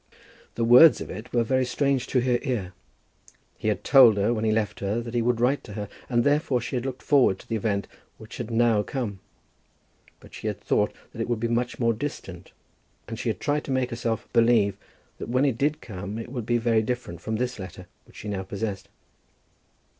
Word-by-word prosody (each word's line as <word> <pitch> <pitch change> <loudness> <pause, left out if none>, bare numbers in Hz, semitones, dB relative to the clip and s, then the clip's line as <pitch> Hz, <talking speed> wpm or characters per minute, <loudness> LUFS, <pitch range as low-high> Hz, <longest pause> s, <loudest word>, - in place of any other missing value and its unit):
The 115 - -1
words 125 +7 +8
of - - -6
it 110 +6 -8
were 120 -1 +2
very 130 +3 +1
strange 135 +1 0
to 125 - +1
her 125 -1 +1
ear. 110 -10 -3 0.8
He - - -5
had - - 0
told 120 -6 +7
her 105 +4 +2
when 110 -2 -2
he 110 - +2
left 110 -1 -1
her 100 +3 -1
that 120 0 -6
he 120 - +1
would 120 0 +1
write 130 +4 +1
to 105 - -9
her, 105 0 -5 0.2
and 120 -2 +2
therefore 145 -3 +2
she 120 +2 -5
had 125 +1 -2
looked 130 -1 -6
forward 135 -10 +4
to - - -16
the 115 - -2
event 100 -2 -1 0.3
which 110 -1 -11
had 120 -2 -5
now 115 -2 +3
come; 105 -3 -4 1.0
but - - -17
she - - -6
had - - -3
thought - - +1 0.2
that - - -5
it - - -3
would 120 -2 0
be 115 - 0
much 120 +1 -1
more 115 -1 +2
distant, 100 -8 -6 0.6
and 115 -1 -6
she 125 - -1
had 105 - -2
tried 150 0 0
to - - -4
make 130 -1 0
herself 115 -1 -2
believe 115 -4 +4 0.4
that - - -6
when 130 +3 +2
it 135 -5 +1
did 150 +2 0
come 100 0 -6
it 115 +1 -6
would 120 -3 -5
be 120 - +2
very 115 -1 +2
different 110 -6 -4
from 110 - -3
this 125 +1 -2
letter 90 -1 -8 0.2
which - - -21
she - - -8
now 100 -2 -2
possessed. 100 +1 -5
115 Hz, 220 wpm, -25 LUFS, 105-125 Hz, 1.0 s, words